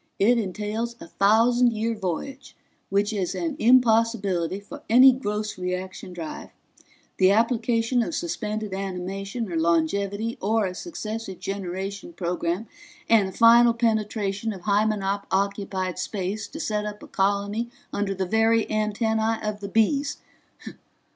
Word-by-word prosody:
"It 235 +4 +4
entails 215 +3 -3
a - - -9
thousand 230 +6 +3
year 225 +1 -1
voyage, 225 - -5 0.3
which 205 +2 +1
is 190 -4 -2
an 325 -4 -2
impossibility 225 -7 +3
for 200 - -11
any 255 +4 +8
gross 215 -4 -3
reaction 180 0 -4
drive; 170 -3 -7 0.7
the 185 - +5
application 230 +2 +2
of 300 +7 -2
suspended 215 - -3
animation 195 +3 -4
or - - -3
longevity 200 +7 0
or 215 +2 +1
a 185 - -3
successive 220 - -6
generation 195 - -5
program, 175 - -2 0.4
and 210 -4 +4
a - - -8
final 235 +2 +6
penetration 215 -2 -1
of 190 - -10
Hymenop 200 0 0
occupied 190 -2 -1
space 200 +2 -3
to 315 - -9
set 210 -8 -1
up 210 0 -6
a - - -10
colony 200 +4 0 0.2
under 200 -1 -1
the 190 0 -1
very 225 +3 +2
antennae 220 +1 0
of 210 -1 -3
the 200 -1 -6
Bees. 275 +7 +1
210 Hz, 135 wpm, -25 LUFS, 195-225 Hz, 0.7 s, any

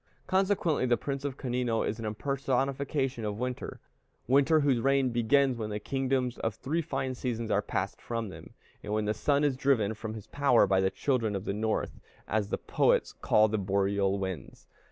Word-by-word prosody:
Consequently 185 -7 +1
the 120 -1 +3
Prince 140 -1 -4
of 140 -2 -3
Canino 125 -3 -1
is 110 - -3
an 110 -1 -2
impersonification 135 +1 -1
of 105 -1 -3
winter; 125 +1 -4 0.5
winter 140 +5 +4
whose 135 -4 +2
reign 135 0 +2
begins 125 +3 +3
when 110 -1 -3
the 105 - -3
kingdoms 130 +1 -1
of 115 - -1
the - - -41
three 155 +6 0
fine 130 -5 -3
seasons 115 -3 -3
are 100 - +3
passed 95 -1 -3
from 115 -3 -3
them, - - -12 0.3
and 105 - -4
when 110 0 0
the 105 - +1
sun 140 +6 +1
is 145 -3 +2
driven 125 -6 +2
from 110 0 -6
his 110 - -8
power 140 -6 +3
by 95 -1 +2
the 95 - +2
children 115 -3 0
of 95 +1 -4
the - - -1
North, 110 +1 -2 0.3
as 105 -2 0
the - - -1
poets - - +1
call 110 0 +3
the 110 0 -1
boreal 100 0 +1
winds. 95 -7 -6
120 Hz, 195 wpm, -29 LUFS, 105-135 Hz, 0.5 s, winter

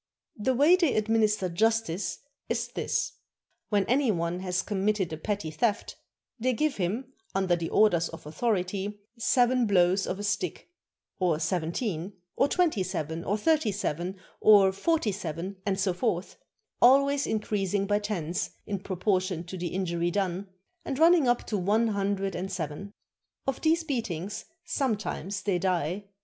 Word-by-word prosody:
The 255 +5 0
way 295 +8 +6
they 335 -7 +2
administer 215 -2 +2
justice 200 -2 0 0.3
is - - -1
this: - - -1 0.6
When 205 -2 +2
any 265 +1 +2
one 170 -1 -1
has 180 -1 -1
committed 200 -3 0
a - - -4
petty 195 -1 -3
theft, 205 +7 -1 0.4
they 255 +3 +1
give 305 +4 0
him, 220 +9 -2 0.2
under 190 -2 +2
the 165 -1 -3
orders 175 -6 +3
of 165 - -10
authority, 200 +3 -1 0.2
seven 245 0 +3
blows 185 -1 +3
of 185 - -2
a 205 - -5
stick, 205 - -2 0.5
or 175 -4 +2
seven 160 0 -1
teen, 190 -3 -3 0.2
or 275 - +3
twenty 320 - +2
seven, 165 -3 -3
or 205 +3 0
thirty 300 -1 +2
seven, 185 -1 -3 0.2
or 200 -3 +7
forty 225 - +1
seven, 185 0 -5
and 195 -1 0
so 190 -2 +1
forth, 180 -1 -2 0.5
always 275 +3 +5
increasing 205 -2 0
by 205 +1 +2
tens 180 -5 -2 0.2
in 200 -2 -3
proportion 185 -2 -1
to 180 +2 -8
the 175 -1 -3
injury 170 -1 -1
done, 190 +1 -2 0.3
and 265 - -3
running 325 -2 +5
up 240 0 +2
to 210 - -1
one 215 +5 +2
hundred 195 -1 -1
and 185 +3 -4
seven. 180 +2 -5 0.5
Of 270 -1 -2
these 325 +1 +3
beatings 210 - -3 0.2
sometimes 215 - -2
they 190 -4 +1
die. 180 +1 -1
200 Hz, 155 wpm, -28 LUFS, 180-225 Hz, 0.6 s, or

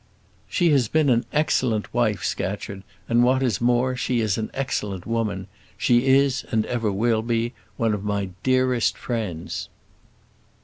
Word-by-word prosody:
"She 175 -3 +2
has 135 -6 +3
been 155 +1 +2
an 120 -1 +2
excellent 130 -8 0
wife, - - +1
Scatcherd; 100 -1 -3 0.3
and 120 +1 +3
what 130 +2 +3
is 115 -6 0
more, 125 +1 +2
she 125 -1 0
is 110 -3 +1
an 110 -1 -3
excellent 105 -9 -3
woman. 110 -4 -2 0.3
She 120 +2 +3
is, 135 0 +3
and 110 -2 +1
ever 115 -4 -1
will 110 +3 +1
be, 115 +1 -1 0.2
one 115 -3 +1
of 100 -1 -3
my 100 -2 -2
dearest 130 -2 +2
friends." 105 -9 -4
120 Hz, 150 wpm, -24 LUFS, 105-130 Hz, 0.3 s, has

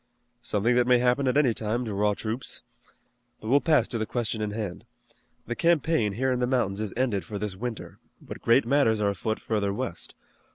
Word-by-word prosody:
"Something 115 0 +1
that 125 0 +3
may 125 -1 +6
happen 125 +2 +2
at 130 - +2
any 135 -6 +4
time 110 +3 -2
to 110 - -4
raw 105 +1 +1
troops. 115 +4 -5 0.8
But 110 - -7
we'll 140 +3 +5
pass 155 -2 +3
to 115 - -2
the 110 - -2
question 115 -2 -2
in 105 - -1
hand. 105 -4 -5 0.6
The 120 - -3
campaign 160 -10 +2
here 130 +5 0
in 125 - 0
the 125 - +1
mountains 110 -6 0
is 105 -2 -3
ended 120 -7 0
for 105 - -6
this 105 -2 -4
winter, 115 +3 -6 0.2
but - - -10
great 115 +3 +4
matters 120 -4 +3
are 100 -1 +2
afoot 110 +3 -3
further 105 -3 -1
west. 100 - -5
115 Hz, 205 wpm, -27 LUFS, 105-125 Hz, 0.8 s, may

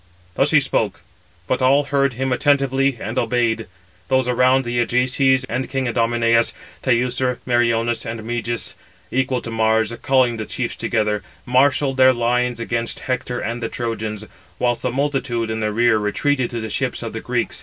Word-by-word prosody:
Thus - - +2
he - - +5
spoke; - - -1 0.4
but 130 +7 -1
all 135 +3 +4
heard 140 -1 +1
him 130 +2 -1
attentively, 135 -1 +2
and 110 +5 -2
obeyed. 115 -1 0 0.4
Those 130 -1 +2
around 130 +1 +3
the 120 0 -1
Ajaces 130 +2 +2
and 130 +1 -3
king 135 -1 -1
Idomeneus, 115 0 +2 0.3
Teucer, 125 0 +1
Meriones, 120 -1 +1
and 115 0 -5
Meges, 120 +1 -2 0.4
equal 130 0 0
to 115 - -5
Mars, 110 0 +1
calling 130 -4 +2
the 110 -2 -5
chiefs - - -3
together, 105 -1 0 0.2
marshalled 135 +2 +2
their 130 0 +6
lines 125 0 0
against 115 0 -2
Hector 125 -1 -2
and 115 +2 -4
the 115 - -2
Trojans; 110 -2 -4 0.3
whilst 120 -1 0
the 125 - 0
multitude 125 -4 -1
in 110 - -2
the 105 -1 -1
rear 115 0 +3
retreated 125 +5 0
to 120 - -4
the 110 -1 -5
ships - - -2
of - - -5
the - - -5
Greeks. - - -2
120 Hz, 165 wpm, -20 LUFS, 115-130 Hz, 0.4 s, their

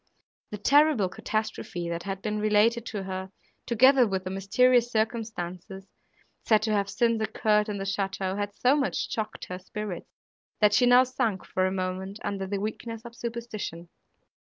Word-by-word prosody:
The 210 - -5
terrible 275 -2 +4
catastrophe 215 -4 -3
that 170 0 -3
had 195 +1 -5
been 215 -1 -2
related 215 +2 +2
to 205 -3 -4
her, 190 0 -5 0.4
together 255 +2 +5
with 190 -2 -2
the 185 - -5
mysterious 240 +5 +3
circumstances 205 -4 -3 0.6
said 215 -2 +3
to 220 - 0
have 200 -1 +1
since 230 +2 +1
occurred 215 0 +1
in 205 - -3
the 195 - -4
château, 195 -1 -2
had 205 0 -3
so 255 +3 +3
much 280 -2 -1
shocked 220 -1 -4
her 180 0 -6
spirits, 195 -1 -6 0.5
that 210 -1 +4
she 245 +4 +4
now 245 +1 +7
sunk 230 -6 -2
for 185 0 0
a - - -2
moment 190 +1 -3
under 195 -1 -3
the 200 +1 -2
weakness 225 +2 -5
of 235 0 -10
superstition. 230 -8 -6
210 Hz, 165 wpm, -27 LUFS, 190-230 Hz, 0.6 s, now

